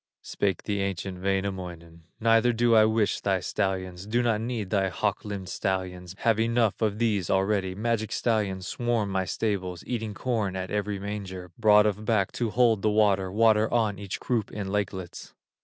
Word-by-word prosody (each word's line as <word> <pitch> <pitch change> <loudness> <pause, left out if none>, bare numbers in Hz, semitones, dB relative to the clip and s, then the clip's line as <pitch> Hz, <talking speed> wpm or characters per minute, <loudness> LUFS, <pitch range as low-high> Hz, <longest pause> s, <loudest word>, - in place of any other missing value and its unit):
Spake 95 -4 -1
the 100 -2 -1
ancient 95 -1 -3
Wainamoinen: 90 -4 -3
"Neither 115 +1 +4
do 120 0 +3
I 110 -1 +7
wish 110 -1 +1
thy 95 -2 +1
stallions, 95 -1 -3
Do 120 +3 +1
not 115 -3 +1
need 115 -5 -3
thy 95 -2 +2
hawk 100 +3 -1
limbed 100 -3 -5
stallions, 95 -2 -3
Have 115 -2 +2
enough 115 -1 +1
of 105 -2 +1
these 105 -6 0
already; 95 -1 +1
Magic 110 +1 -1
stallions 100 -5 0
swarm 115 0 -1
my 95 -1 0
stables, 95 -3 -2
Eating 110 -4 -3
corn 110 -5 -1
at 95 0 -4
every 105 -1 -1
manger, 95 -3 -6
Broad 105 -2 +5
of 105 0 -1
back 105 -3 +1
to 120 -2 -2
hold 115 -2 +3
the 110 - +2
water, 100 -3 +2
Water 110 +1 +3
on 110 -4 +1
each 100 -2 -5
croup 115 -5 -1
in 100 -2 -4
lakelets." 95 -3 -4
105 Hz, 175 wpm, -27 LUFS, 95-110 Hz, -, I